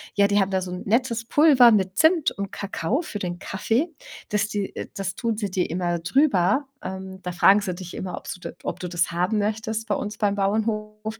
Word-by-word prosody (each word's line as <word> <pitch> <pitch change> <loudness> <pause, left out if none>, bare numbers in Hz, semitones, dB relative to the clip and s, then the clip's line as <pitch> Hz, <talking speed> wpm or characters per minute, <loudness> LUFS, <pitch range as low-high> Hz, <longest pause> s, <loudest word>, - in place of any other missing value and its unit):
ja, 200 - +5
die 205 0 +2
haben 195 0 +2
da 190 -1 0
so 180 -1 -5
'n 180 - -5
nettes 230 0 +1
Pulver 275 -3 +6
mit 190 -2 +1
Zimt 320 -1 +4
und 200 0 -5
Kakao 200 - -2
für 210 - -6
den 175 -2 -3
Kaffee. 230 - -1 0.4
Das 210 0 +1
die 205 -2 -4
äh, - - -5
das 195 -2 -3
tun 230 0 -2
sie 205 -4 -3
dir 185 -1 0
immer 175 0 -1
drüber. 250 - +2
Ähm, 190 0 -7
da 180 - -4
fragen 195 +3 +5
sie 185 -3 -3
dich 180 -1 -9
immer, 180 -1 -5
ob's - - -6
du 180 - -13
d - - -8
ob - - -4
du 180 - -5
das 175 -1 0
haben 180 +5 0
möchtest 220 +1 -2
bei 205 - +1
uns 210 +1 -4
beim 205 -2 +1
Bauernhof. 215 +1 -2
205 Hz, 225 wpm, -24 LUFS, 185-220 Hz, 0.4 s, Pulver